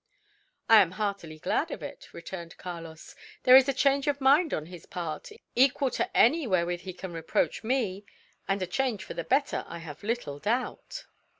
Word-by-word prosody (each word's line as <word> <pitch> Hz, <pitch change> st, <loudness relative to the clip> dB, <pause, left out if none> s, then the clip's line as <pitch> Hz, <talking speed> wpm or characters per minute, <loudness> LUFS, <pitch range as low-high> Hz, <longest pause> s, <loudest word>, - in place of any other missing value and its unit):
"I 225 Hz, -2 st, +8 dB
am 180 Hz, -2 st, 0 dB
heartily 200 Hz, -6 st, -3 dB
glad -, -, -1 dB
of -, -, -6 dB
it," -, -, -9 dB
returned 170 Hz, 0 st, -8 dB
Carlos. 165 Hz, -3 st, -9 dB, 0.3 s
"There 255 Hz, -, +8 dB
is 265 Hz, +1 st, +7 dB
a -, -, +4 dB
change 275 Hz, +1 st, +2 dB
of 285 Hz, -1 st, +1 dB
mind 285 Hz, +5 st, +4 dB
on 155 Hz, -, -2 dB
his 175 Hz, -1 st, -12 dB
part, 170 Hz, -3 st, -5 dB, 0.3 s
equal 265 Hz, +1 st, +3 dB
to -, -, -2 dB
any 295 Hz, +4 st, +4 dB
wherewith 175 Hz, -3 st, +1 dB
he 185 Hz, 0 st, -7 dB
can 185 Hz, 0 st, -8 dB
reproach 165 Hz, +6 st, -1 dB
me; 220 Hz, -5 st, -1 dB, 0.4 s
and 195 Hz, -1 st, 0 dB
a -, -, 0 dB
change 240 Hz, +2 st, -1 dB
for -, -, -7 dB
the 170 Hz, -, -4 dB
better, 275 Hz, -, +1 dB
I 170 Hz, -, -7 dB
have 160 Hz, -3 st, -9 dB
little 205 Hz, -10 st, -3 dB
doubt." 245 Hz, -, -3 dB
200 Hz, 185 wpm, -28 LUFS, 170-265 Hz, 0.4 s, I